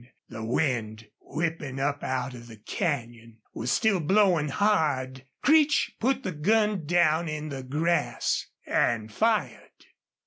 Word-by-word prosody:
The 110 - -7
wind, 115 -3 -1
whipping 155 -4 -4
up 145 +1 -1
out 130 0 -2
of 120 -1 -11
the 110 -2 -12
canyon, 115 - -4 0.2
was 120 +3 -3
still 210 -4 +2
blowing 180 -2 +3
hard. 135 -8 0 0.2
Creech 300 -1 +4
put 260 +2 0
the 185 - -2
gun 205 +2 +1
down 170 -1 +2
in 155 0 -4
the 135 -2 -5
grass 155 +6 0 0.2
and 110 -2 0
fired. 225 -1 0
150 Hz, 130 wpm, -27 LUFS, 125-185 Hz, 0.2 s, Creech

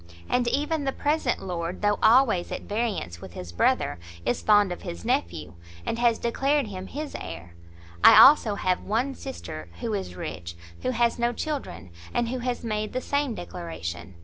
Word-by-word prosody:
And 245 -1 +1
even 295 +4 0
the 270 - +1
present 290 -3 0
lord, 175 0 -4
though 205 0 +2
always 225 -6 +4
at - - -4
variance 205 - -3
with 90 - -10
his 90 -1 -7
brother, 85 - +1 0.3
is 120 - 0
fond 205 -3 +4
of 175 - -5
his 85 0 -7
nephew, 85 -2 -1 0.3
and 230 - -2
has 235 -2 +3
declared 275 +4 +1
him 190 -3 -7
his 300 +1 -6
heir. 85 0 -8 0.5
I, - - +10
also, 250 -7 +7
have 185 -2 0
one 240 +6 -1
sister, 260 - -8
who 230 -3 -2
is 190 - -4
rich, 85 +1 -6 0.3
who - - -1
has 235 -1 +1
no 240 0 +1
children, 165 - -5 0.2
and 235 - +1
who 255 +1 -2
has 245 0 -3
made 215 -2 -2
the 255 - 0
same 285 -2 -1
declaration. 85 +1 -6
215 Hz, 175 wpm, -26 LUFS, -, 0.5 s, I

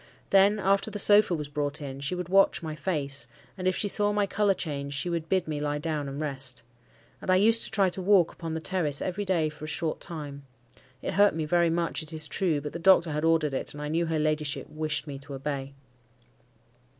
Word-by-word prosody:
Then, 200 +2 +5
after 195 +1 +1
the 210 - -5
sofa 205 -2 +6
was 150 -2 -5
brought 145 0 -2
in, 135 -2 -7
she 140 +6 -3
would 180 -1 -4
watch 195 -1 +3
my 155 -1 -4
face, 145 -3 -1 0.3
and 185 -1 -3
if 185 - +2
she 210 - +1
saw 205 +1 +3
my 205 -1 +1
colour 200 0 +1
change, 140 -4 -4
she 175 +5 -2
would 165 -1 -3
bid 185 -3 +1
me 150 -2 -3
lie 145 0 -1
down 150 -2 -3
and 135 +1 -6
rest. 135 -5 0 0.6
And - - -7
I 185 - +5
used 225 +4 +4
to - - -8
try 200 -3 +2
to 190 - -4
walk 185 -3 +4
upon 165 -2 -6
the 160 - -4
terrace 160 -5 0
every 195 +3 -3
day 175 -5 +2
for 150 0 -8
a 155 - -3
short 160 -2 -2
time: 145 -4 -6 0.6
it - - -3
hurt 205 -1 +4
me 160 -1 -2
very 170 +2 +2
much, 165 -1 -1
it 155 +1 -8
is 155 -1 -2
true, 160 0 0
but 150 0 -6
the 170 - -5
doctor 175 -2 +5
had 150 +1 -2
ordered 160 -3 +2
it, 130 - -4
and - - -8
I 150 - -4
knew 165 +2 0
her 160 -1 -1
ladyship 150 -2 -1
wished 155 -1 -2
me 140 -3 -7
to 140 0 -9
obey. 135 0 -5
160 Hz, 235 wpm, -27 LUFS, 145-185 Hz, 0.6 s, sofa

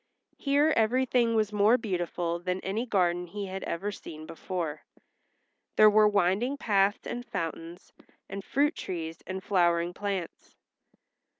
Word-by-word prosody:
Here 290 +2 +3
everything 240 0 +2
was 215 -1 +1
more 210 +4 +5
beautiful 175 -5 -2
than 180 +1 -2
any 215 +6 -2
garden 180 -4 +1
he 200 +3 -5
had 190 0 -6
ever 195 +5 -3
seen 155 -5 -9
before. 165 -2 -4 0.9
There 215 0 +7
were 215 0 +6
winding 205 +7 +1
paths 200 -5 +1
and 245 - -4
fountains, 165 -3 -6 0.3
and 195 0 -6
fruit 290 - +1
trees 165 -2 -5
and 190 +1 -5
flowering 175 -3 +2
plants. 195 -3 -5
195 Hz, 130 wpm, -28 LUFS, 175-220 Hz, 0.9 s, There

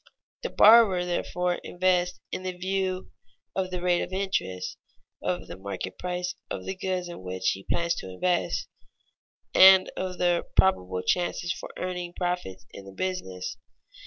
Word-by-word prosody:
The - - -3
borrower, 210 -5 +7
therefore, 180 0 -1
invests 180 0 +1
in - - -3 0.2
view 185 0 -2 0.4
of 190 -1 -1
the 180 -1 -4
rate 180 -1 +3
of - - -4
interest, 95 - -2 0.5
of 90 0 -2
the - - -8
market 95 -1 -6
price 180 0 -2 0.2
of - - -5
the 190 - -2
goods 185 -1 -2
in 175 - -8
which 95 0 -1
he 95 - -4
plans 170 0 +1
to 95 - -6
invest, 175 - 0 0.9
and 190 0 +8
of 185 -1 -3
the 175 -1 +1
probable 90 - +2
chances 175 - 0
for - - -8
earning 180 -1 -4
profits 175 - -3
in 100 - -10
the 100 - -10
business. 95 - -4
180 Hz, 150 wpm, -27 LUFS, -, 0.9 s, and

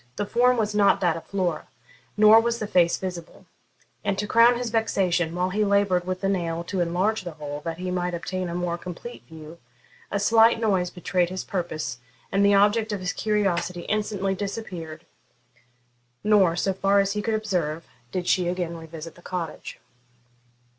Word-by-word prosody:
The 205 - -2
form 245 +4 +3
was 215 -2 0
not 205 -1 +4
that 175 -3 +2
of 165 - -9
Flora, 185 -4 -2 0.5
nor 215 +1 +8
was 235 +1 0
the 220 - -3
face 175 -4 +3
visible; 180 -3 -7 0.6
and, 195 - -1
to 210 - -1
crown 230 +3 +5
his 240 -2 -3
vexation, 185 -7 0
while 180 +1 0
he 210 +3 +1
laboured 200 -3 +2
with 185 0 -3
the 195 - 0
nail 170 -3 -1
to 185 +2 -4
enlarge 185 +6 0
the 175 -2 -6
hole, 145 -1 -6
that 165 -1 -3
he 180 +1 -4
might 180 -1 -1
obtain 180 +1 -4
a 170 - -4
more 175 -1 -2
complete 180 +8 -8
view, 160 +1 -12 0.5
a 200 - -1
slight 225 +2 +5
noise 190 -6 +1
betrayed 180 0 -1
his 185 +1 -4
purpose, 170 -9 -4 0.3
and 195 +1 +2
the 200 0 +5
object 210 +2 +3
of 205 - -2
his 185 -1 -2
curiosity 185 -5 0
instantly 205 -1 -1
disappeared, 185 -6 -6 1.2
nor, 200 -5 +4
so 190 +2 0
far 195 +1 +2
as 195 0 +1
he 210 0 -2
could 220 +1 -1
observe, 175 -7 -2 0.3
did 180 -1 -3
she 180 -1 +2
again 175 -1 -2
revisit 160 0 -9
the 175 - -18
cottage. 175 -2 -6
185 Hz, 180 wpm, -25 LUFS, 175-210 Hz, 1.2 s, nor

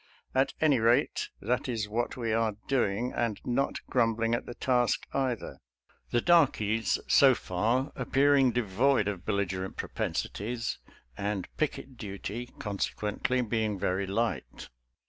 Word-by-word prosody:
At 135 +1 +2
any 145 -5 +4
rate, 115 +2 +2
that 125 +5 0
is 110 -4 -1
what 115 +5 -2
we 115 -3 -1
are 110 -2 +1
doing, 120 -2 0
and 115 -3 -1
not 135 +3 -1
grumbling 115 -1 +1
at 120 - -1
the 120 - -7
task, 125 -2 +1
either 130 -4 -2 0.3
— - - -36
the 120 - +2
darkies, 115 - +3
so - - +6
far, 115 +9 0
appearing 135 +1 +3
devoid 120 +1 +2
of 100 -4 -4
bel 110 - +1
ligerent 95 -1 -2
propensities, 115 +3 -3 0.4
and 100 -2 -2
picket 140 -4 -3
duty, 105 +3 -5
conse 100 -2 -2
quently, 120 +4 -1
being 110 -2 0
very 95 +1 -1
light. 115 +4 -2
115 Hz, 140 wpm, -29 LUFS, 105-125 Hz, 0.4 s, so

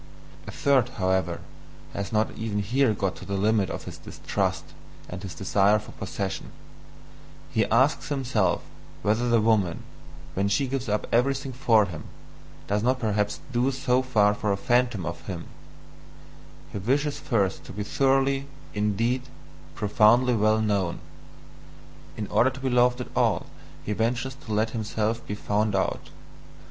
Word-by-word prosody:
A - - -5
third, 140 -4 +2
however, 95 -2 0 0.5
has 100 0 -4
not 110 0 +1
even 110 -2 -3
here 120 +5 +2
got 95 -1 -1
to - - -10
the 100 - -3
limit 105 -1 +2
of - - -5
his - - -9
distrust - - -3 0.3
and 90 0 -7
his 90 -5 -7
desire 100 +2 +3
for 105 - -8
possession: 95 0 -4 1.0
he 110 - +2
asks 135 +4 +2
himself 120 -10 +1 0.4
whether 110 +5 +1
the 120 -1 +4
woman, 105 -6 +2 0.5
when 100 +1 +1
she 135 +8 +2
gives 130 -3 -3
up 105 +1 0
everything 135 +2 +1
for 115 -4 +4
him, 80 -5 -7 0.6
does 105 +1 0
not 130 +3 +2
perhaps 105 -3 -1
do 125 +2 +2
so 130 -1 +1
for 105 -5 +2
a 100 - +1
phantom 120 -4 +1
of 85 0 -6
him; 90 -4 -5 1.3
he - - -4
wishes 140 +7 0
first 100 -8 0
to - - -9
be 105 +2 -4
thoroughly, 135 +3 +2 0.3
indeed, 115 +5 0 0.5
profoundly 115 +4 +4
well 110 0 +3
known; 100 -5 0 1.2
in 105 - -2
order 125 - +4
to 135 +1 -9
be 130 -1 0
loved 125 +1 +3
at - - -8
all - - +2 0.4
he 105 - -1
ventures 120 +4 -1
to 135 -4 -10
let 110 +1 +1
himself 110 0 -2
be 105 - -3
found 105 0 0
out. 95 - -1
110 Hz, 150 wpm, -26 LUFS, 100-125 Hz, 1.3 s, the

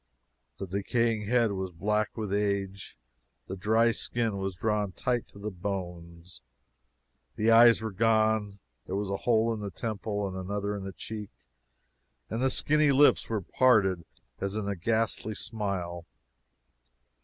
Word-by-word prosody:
The - - -4
decaying 105 +3 -1
head 120 -2 +3
was 95 -1 -3
black 105 +6 -1
with 105 -3 -3
age, 100 -2 -2 0.5
the 95 - -6
dry 110 +4 +3
skin 115 -2 -1
was 95 -1 -3
drawn 105 -1 -1
tight 120 +6 -1
to - - -17
the 105 +1 -5
bones, 90 -2 -6 0.9
the 110 +2 +2
eyes 115 0 +7
were 110 - -3
gone, 110 -1 +2 0.3
there 95 - -3
was 100 0 -2
a 100 - -1
hole 115 0 +3
in 110 - -5
the 100 -1 -4
temple 105 0 -3
and 95 - -6
another 100 +2 -3
in 100 -1 -6
the 95 - -5
cheek, 105 +2 -7 1.0
and 115 +2 -2
the 130 - +3
skinny 150 +2 +3
lips 140 +2 +4
were 110 -3 -1
parted 95 -5 +3 0.4
as 100 +1 -3
in 105 -2 -2
a 100 - -1
ghastly 110 +2 -1
smile! 90 -7 -4
105 Hz, 150 wpm, -28 LUFS, 95-110 Hz, 1.0 s, eyes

